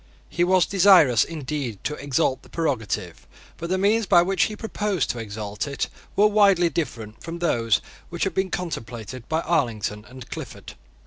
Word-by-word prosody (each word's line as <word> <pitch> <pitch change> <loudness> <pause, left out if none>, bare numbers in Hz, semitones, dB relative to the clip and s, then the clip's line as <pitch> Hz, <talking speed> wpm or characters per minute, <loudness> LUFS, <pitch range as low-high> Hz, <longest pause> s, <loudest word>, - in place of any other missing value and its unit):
He 175 - 0
was 185 -1 +4
desirous, 180 - +6
indeed, 145 -7 -4
to 150 - -2
exalt 135 -2 0
the - - -18
prerogative: 105 - -3 0.3
but 170 - -5
the 185 - +1
means 205 +3 +2
by 175 -4 +6
which 190 +2 +2
he 215 - -5
proposed 210 - -1
to 120 - -7
exalt 105 +2 -5
it 140 - -3 0.3
were 205 - +5
widely 200 -5 +4
different 115 -9 -4
from 165 +1 -5
those 115 -11 +1 0.3
which 175 0 -3
had 195 - 0
been 190 +1 0
contemplated 120 - -6
by 160 +1 +1
Arlington 110 -10 -1
and 130 -1 -11
Clifford. - - -8
155 Hz, 170 wpm, -24 LUFS, 115-185 Hz, 0.3 s, desirous